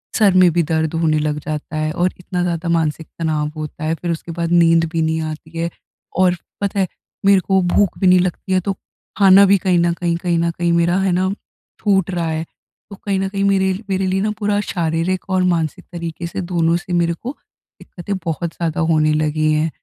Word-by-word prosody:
Sir 205 -4 +4
में 180 - +6
भी 170 +1 +2
दर्द 160 0 -1
होने 160 -2 +1
लग 150 0 -1
जाता 155 +1 -5
है। 155 0 -1
और 180 +3 0
इतना 180 0 -3
ज़्यादा 170 -1 -2
मानसिक 160 -1 0
तनाव 155 -2 0
होता 155 0 -6
है 160 - 0
फिर 170 +1 -3
उसके 165 +1 -5
बाद 170 0 -3
नींद 165 -1 +5
भी 165 - 0
नहीं 160 0 0
आती 160 +1 -7
है। 170 0 -1 0.5
और 180 -1 +4 0.3
पता 200 0 -1
है 190 - +2 0.4
मेरे 200 -1 +6
को 190 0 +2
भूख 180 +1 +1
भी 190 - +3
नहीं 180 0 +6
लगती 180 +1 -2
है 185 - +4
तो 195 - +1 0.4
खाना 195 0 +7
भी 200 +1 +5
कहीं 180 -2 +1
न 170 0 +2
कहीं, 170 -1 -1
कहीं 170 -1 0
न 170 0 +1
कहीं 170 +1 -1
मेरा 170 +2 +2
है 190 -1 +1
ना 185 +1 +1 0.5
छूट 190 -2 +2
रहा 170 -2 -1
है। 160 0 -2 0.5
तो 200 - -8
कहीं 195 0 -2
न 195 - 0
कहीं 195 0 -2
मेरे 190 -1 +2 0.2
मेरे 190 0 0
लिए 190 +1 0
ना 210 +1 0
पूरा 205 -1 +1
शारीरिक 170 +2 -1
और 185 -1 +2
मानसिक 160 -3 -2
तरीक़े 170 0 -5
से 180 - -4
दोनों 170 -2 +1
से 175 +1 -6
मेरे 170 -1 +2
को 250 - -7 0.4
दिक्कतें 195 +3 -6
बहुत 165 0 -3
ज़्यादा 165 -2 -2
होने 155 -1 +3
लगी 155 0 +1
हैं। 155 +1 +1
170 Hz, 220 wpm, -19 LUFS, 160-190 Hz, 0.5 s, खाना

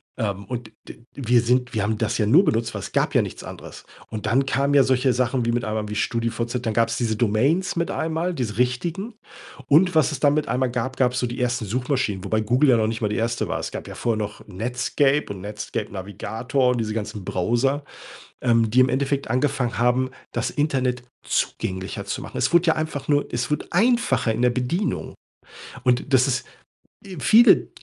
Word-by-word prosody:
Ähm, 100 -4 -3
und 120 -3 -6 0.2
d - - -11
wir 120 -3 +2
sind 125 +1 +1
wir 110 - 0
haben 110 +1 0
das - - -1
ja 105 - +2
nur 165 - +6
benutzt, 115 -3 0
weil 100 - -4
es - - -7
gab - - 0
ja - - +5
nichts - - -7
anderes. - - -10 0.3
Und 110 -1 -5
dann 130 +5 +2
kamen 140 +2 +1
ja 140 - +7
solche 130 0 +2
Sachen 125 0 0
wie, 120 - +1
mit 120 0 -1
einmal 110 -1 -3
wie 105 - -4
StudiVZ, 115 +2 -1
dann 110 - 0
gab's 115 0 +2
diese 115 -3 0
Domains 125 - +1
mit 170 0 -1
einem 160 0 -2
Mal, 170 +3 -1
diese 110 -8 -3
richtigen. 170 - -1 0.5
Und 170 +4 +4
was 155 -1 +4
es 145 - -4
dann 145 0 +3
mit 155 - 0
einmal 125 +2 0
gab, 125 +2 -3
gab's 125 -1 +2
so - - 0
die 120 +3 -6
ersten 120 -2 0
Suchmaschinen, 125 -3 -1
wobei 110 +2 0
Google 125 +7 +3
ja 120 - +6
noch 110 - +2
nicht 115 +1 -3
mal 105 - +1
die 105 - -2
1. 115 +1 -1
war. - - -2
Es - - -5
gab - - -7
ja - - -8
vorher 115 -2 -1
noch 105 -1 -5
„Netscape“ 125 +6 0
und 95 - -10
„Netscape 105 +1 -5
Navigator“ 110 +7 -2
und 125 - -1
diese 110 -1 -2
ganzen 105 -3 -5
Browser, 120 +11 0 0.6
ähm, 115 -2 +3
die 120 +4 +3
im 130 - +4
Endeffekt 140 0 -1
angefangen 125 -3 0
haben, 125 +2 +2 0.2
das - - -1
Internet 130 -5 0 0.2
zugänglicher 95 0 -2
zu - - -4
machen. - - -8
Es - - 0
wurde 170 0 +4
ja 160 - +4
einfach 155 -3 -4
nur 145 -1 +2
es 120 +1 -2
wurde 150 - -1
einfacher 180 - +2
in 115 - -2
der 125 - +5
Bedienung. 130 +12 -2 0.7
Und 125 +2 +1
das 130 0 +5
ist, 130 -1 -1 0.6
äh 190 -2 -9
viele 235 - +6
125 Hz, 210 wpm, -23 LUFS, 110-140 Hz, 0.7 s, ja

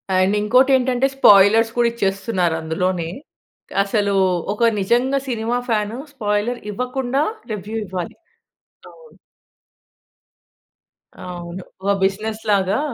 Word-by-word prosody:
And 185 +2 +3
ఇంకోటి 255 +6 +4
ఏంటంటే 255 0 +1
spoilers 220 -1 +6
కూడా 240 -1 +4
ఇచ్చేస్తున్నారు 195 -5 -1
అందులోనే. 170 +1 -1 0.8
అసలు, 200 0 0 0.4
ఒక 235 - -5 0.2
నిజంగా 245 +7 +1
సినిమా 235 0 -1
ఫ్యాన్ 210 -1 0 0.2
స్పాయిలర్ 215 0 -1
ఇవ్వకుండా 250 +4 -2 0.3
రివ్యూ 210 +1 -5
ఇవ్వాలి. 180 -2 -5 0.8
అవును. 485 -1 -18 2.0
అవును. 175 0 -8 0.2
ఓహ్! 200 0 +2
బిజినెస్ 215 +3 -1
లాగా 195 +3 +2
210 Hz, 95 wpm, -20 LUFS, 190-245 Hz, 2.0 s, spoilers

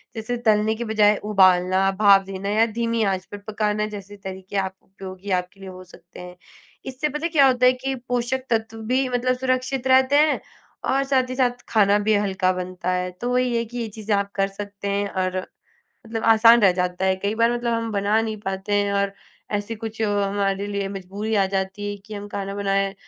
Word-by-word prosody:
जैसे, 225 +2 -3
तलने 220 -1 +2
की 235 - -4
बजाय 210 -1 +4
उबालना, 185 0 +4
भाप 195 0 +5
देना 195 +1 -5
या 220 +2 +3
धीमी 230 -1 0
आँच 190 -2 -1
पर 205 - -6
पकाना 210 0 -1
जैसे 205 +1 -10
तरीके 190 0 -7
आप 190 -1 -1
उपयोगी 190 0 -9
आपके 180 +2 -21
लिए 195 - -9
हो 185 0 -10
सकते 175 -1 -16
हैं। 180 0 -9 0.5
इससे 265 +3 -2
पता 300 +3 -4
है - - 0
क्या 280 -4 +6
होता 250 -1 +3
है 255 - +6
कि 265 +1 -3
पोषक 245 +2 -1
तत्व 225 -1 -1
भी, 255 +4 0
मतलब 250 +1 0
सुरक्षित 255 0 -1
रहते 260 +2 +4
हैं 305 0 +3 0.5
और 275 0 +2
साथ 265 -2 +1
ही 255 - -4
साथ 245 -2 0
खाना 205 -2 +4
भी 220 - +4
हल्का 190 -2 +1
बनता 185 0 -4
है। 180 0 -1
तो 245 - -1
वही 250 -1 +1
है 230 - -1
कि 240 +2 -9
ये 230 -2 -2
चीज़ें 210 -1 0
आप 200 0 -1
कर 195 0 +1
सकते 200 0 -7
हैं 200 0 0
और 185 -1 -2 0.7
मतलब 225 0 -4
आसान 230 +1 +7
रह 190 - +6
जाता 180 0 -2
है। 190 - +2
कई 200 +3 -2
बार, 230 +1 +2
मतलब 240 -1 -1
हम 230 -1 -2
बना 205 +2 +2
नहीं 220 -1 -3
पाते 195 0 -4
हैं 205 0 +1
और 200 0 0 0.4
ऐसे 205 +2 -2
कुछ 220 0 -7
हमारे 200 -1 0
लिए 200 -1 -3
मजबूरी 200 +3 -4
आ 195 - +4
जाती 195 +2 -2
है 205 - -5
कि 215 - -8
हम 205 0 -7
खाना 200 -1 -5
बनाए 195 -1 0
205 Hz, 210 wpm, -23 LUFS, 195-235 Hz, 0.7 s, आसान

